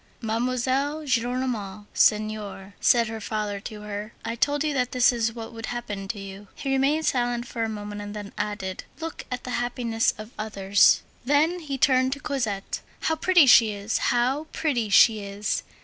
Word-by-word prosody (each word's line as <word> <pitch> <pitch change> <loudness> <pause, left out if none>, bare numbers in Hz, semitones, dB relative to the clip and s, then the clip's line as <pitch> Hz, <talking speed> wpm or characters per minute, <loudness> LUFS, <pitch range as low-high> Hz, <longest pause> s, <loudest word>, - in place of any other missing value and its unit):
"Mademoiselle 255 +6 -1
Gillenormand 240 -5 -1
senior," 210 -2 +1
said 235 -2 +4
her 225 0 -6
father 210 -1 -3
to 210 +1 -8
her, 210 +1 -6
"I 230 - -2
told 290 +5 +1
you 305 -1 0
that 250 -3 -1
this 250 +1 +4
is 230 -1 0
what 230 0 -8
would 225 0 -6
happen 210 -5 -5
to 205 +1 -4
you." 195 +1 -9
He 270 - -3
remained 280 +4 +2
silent 240 -1 0
for 230 -1 -3
a 225 - -1
moment, 205 -1 -6
and 205 0 -7
then 205 -1 -7
added: 205 -3 -4
"Look 325 0 -6
at 250 0 -4
the 250 - -5
happiness 235 -2 0
of 215 +2 -9
others." 200 -2 +3 0.2
Then 300 +7 +2
he 290 -5 -4
turned 260 0 +3
to 280 - -7
Cosette. 225 -9 -3 0.2
"How 320 - +1
pretty 345 0 +5
she 230 -4 +7
is! 205 +2 -2
how 260 +6 +1
pretty 245 -9 -1
she 215 +2 +6
is! 200 +1 -2
230 Hz, 180 wpm, -25 LUFS, 210-260 Hz, 0.2 s, she